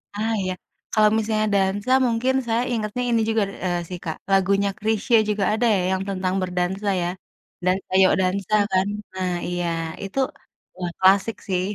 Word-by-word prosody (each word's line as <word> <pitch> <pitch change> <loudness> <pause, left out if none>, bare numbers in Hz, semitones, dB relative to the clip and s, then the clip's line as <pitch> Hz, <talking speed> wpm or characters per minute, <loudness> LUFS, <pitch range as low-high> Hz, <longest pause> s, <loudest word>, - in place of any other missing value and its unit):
Ah, 220 +2 -1
iya, 185 0 -2 0.4
kalau 215 -1 +5
misalnya 215 0 0
dansa 200 +4 +1
mungkin 240 +2 +1
saya 230 +1 +1
ingetnya 220 +2 -2
ini 230 -1 +2
juga 220 -1 +2
nih - - -9
eee, 175 -1 0
sih 180 - -5
Kak 160 -2 -4
lagunya 195 +1 +3
Chrisye 220 +2 +1
juga 205 -1 0
ada 230 +2 +1
ya 190 - +1
yang 190 0 0
tentang 185 -1 -1
berdansa 180 +3 -2
ya, 175 - 0 0.6
Dansa 185 +1 0
Yok 185 - +5
Dansa 190 +2 -1 0.2
kan? 190 +1 +2 0.3
Nah, 185 -1 -2 0.2
iya, 175 0 -2 0.4
itu, 195 +7 -4 0.6
wah, 175 -1 -3
klasik 195 +4 +4
sih. 185 -2 0
195 Hz, 170 wpm, -23 LUFS, 185-215 Hz, 0.6 s, kalau